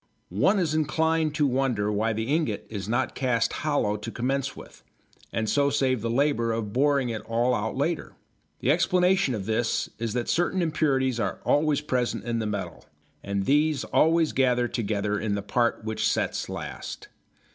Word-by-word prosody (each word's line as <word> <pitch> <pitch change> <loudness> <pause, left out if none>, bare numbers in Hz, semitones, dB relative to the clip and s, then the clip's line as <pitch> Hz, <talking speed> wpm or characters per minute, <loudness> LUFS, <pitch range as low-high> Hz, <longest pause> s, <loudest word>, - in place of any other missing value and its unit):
One 195 - +4
is 170 -5 +1
inclined 160 0 +1
to 150 - +2
wonder 125 -6 +1
why 110 +2 0
the 110 +1 -2
ingot 140 -4 -1
is 100 -2 -5
not 120 +2 0
cast 125 -3 0
hollow 145 -9 0
to 110 +2 -6
commence 135 +4 -2
with, - - -13 0.5
and 110 0 -1
so 140 +4 +2
save 130 -4 +1
the 115 - -2
labour 120 -2 +1
of 110 -2 -3
boring 140 -1 +2
it 110 -2 -3
all 120 +2 +1
out 110 +1 -2
later. 160 +4 -2 0.5
The 130 - +3
explanation 180 -3 +2
of 100 -3 -5
this 110 +2 0
is 115 -2 -2
that 120 -1 -2
certain 175 +1 +1
impurities 135 -6 +1
are 100 -3 -2
always 145 0 +2
present 125 -5 -1
in 115 -1 -2
the 110 - -2
metal 95 -6 -5 0.4
and 100 -1 -2
these 150 0 +2
always 165 0 +3
gather 125 -2 +2
together 105 -3 -1
in 105 -2 -1
the 100 - -3
part 115 +2 0
which 110 0 0
sets - - -1
last. - - -7
125 Hz, 175 wpm, -26 LUFS, 110-150 Hz, 0.5 s, One